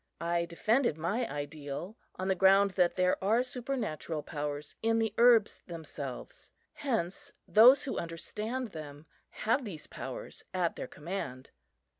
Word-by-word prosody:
I 170 Hz, 0 st, 0 dB
defended 215 Hz, -, +1 dB
my 210 Hz, +9 st, -1 dB
ideal 145 Hz, +6 st, -5 dB, 0.2 s
on 185 Hz, -, -3 dB
the 190 Hz, -, +3 dB
ground 195 Hz, +2 st, +5 dB
that 180 Hz, -2 st, +2 dB
there 185 Hz, 0 st, +2 dB
are 225 Hz, +5 st, +3 dB
supernatural 240 Hz, -, -3 dB
powers 145 Hz, -1 st, -4 dB
in 225 Hz, 0 st, +2 dB
the 225 Hz, -2 st, +1 dB
herbs 235 Hz, -3 st, +5 dB
themselves; 150 Hz, -6 st, -7 dB, 0.2 s
hence 225 Hz, -10 st, -2 dB, 0.2 s
those 250 Hz, +6 st, +8 dB
who 275 Hz, -, -2 dB
understand 215 Hz, +9 st, -4 dB
them 150 Hz, -3 st, -9 dB, 0.2 s
have 240 Hz, +5 st, 0 dB
these 185 Hz, -9 st, -6 dB
powers -, -, -7 dB
at 175 Hz, -2 st, +1 dB
their -, -, -5 dB
command. 150 Hz, -6 st, -6 dB
185 Hz, 135 wpm, -31 LUFS, 155-225 Hz, 0.2 s, those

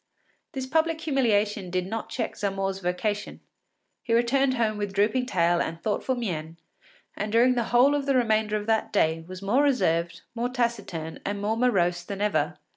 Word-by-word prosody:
This 265 Hz, -1 st, -3 dB
public 320 Hz, +3 st, +1 dB
humiliation 215 Hz, -, +1 dB
did 180 Hz, 0 st, -1 dB
not 220 Hz, +4 st, -5 dB
check -, -, -3 dB
Zamore’s 195 Hz, -1 st, -2 dB
vocation. 200 Hz, +3 st, -2 dB, 0.6 s
He 230 Hz, -, 0 dB
returned 260 Hz, +3 st, +2 dB
home 220 Hz, -3 st, 0 dB
with 205 Hz, -1 st, -3 dB
drooping 215 Hz, +6 st, +1 dB
tail 175 Hz, -4 st, +2 dB
and 165 Hz, 0 st, -3 dB
thoughtful 220 Hz, +7 st, -1 dB
mien, 165 Hz, -9 st, -4 dB, 0.6 s
and 210 Hz, +1 st, -3 dB
during 240 Hz, +3 st, +5 dB
the 240 Hz, -2 st, 0 dB
whole 250 Hz, +5 st, +4 dB
of 285 Hz, -1 st, -1 dB
the 275 Hz, -, +2 dB
remainder 220 Hz, -3 st, +2 dB
of 210 Hz, -, -5 dB
that 220 Hz, 0 st, 0 dB
day 165 Hz, -6 st, +1 dB
was 185 Hz, +1 st, -8 dB
more 230 Hz, +8 st, +3 dB
reserved, 170 Hz, -, +1 dB
more 240 Hz, +1 st, -2 dB
taciturn, 205 Hz, -10 st, -3 dB
and 200 Hz, 0 st, -3 dB
more 210 Hz, +2 st, 0 dB
morose 185 Hz, -8 st, +2 dB
than 195 Hz, +2 st, -6 dB
ever. 210 Hz, 0 st, 0 dB
210 Hz, 175 wpm, -26 LUFS, 185-245 Hz, 0.6 s, during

